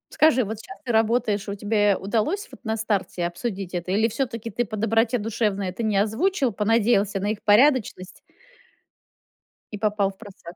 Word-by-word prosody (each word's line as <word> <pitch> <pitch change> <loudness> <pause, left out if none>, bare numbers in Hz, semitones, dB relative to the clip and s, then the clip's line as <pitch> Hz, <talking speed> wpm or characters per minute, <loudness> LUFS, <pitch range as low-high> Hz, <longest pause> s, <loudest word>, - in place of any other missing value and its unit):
Скажи, 280 -5 +4
вот 220 +1 -5
щас 390 - -11
ты 245 - -2
работаешь, 220 -2 +1
и - - -3
у - - -4
тебе 205 0 +2
удалось 240 - -1
вот - - -15
на 220 0 -1
старте 205 -5 -2
обсудить 190 +1 -4
это? 175 +1 -3
Или 220 +4 +2
всё-таки 230 -1 -3
ты 240 +4 -1
по 215 - -6
доброте 225 +3 +1
душевной 205 -3 -1
это 185 +6 -5
не 215 -2 0
озвучил, 265 - +1
понадеялся 210 -2 +1
на 200 - -1
их 215 - -5
порядочность 215 -4 +2 1.5
и 210 - -4
попал 205 -1 0
впросак? 190 -4 -13
215 Hz, 170 wpm, -24 LUFS, 200-230 Hz, 1.5 s, Скажи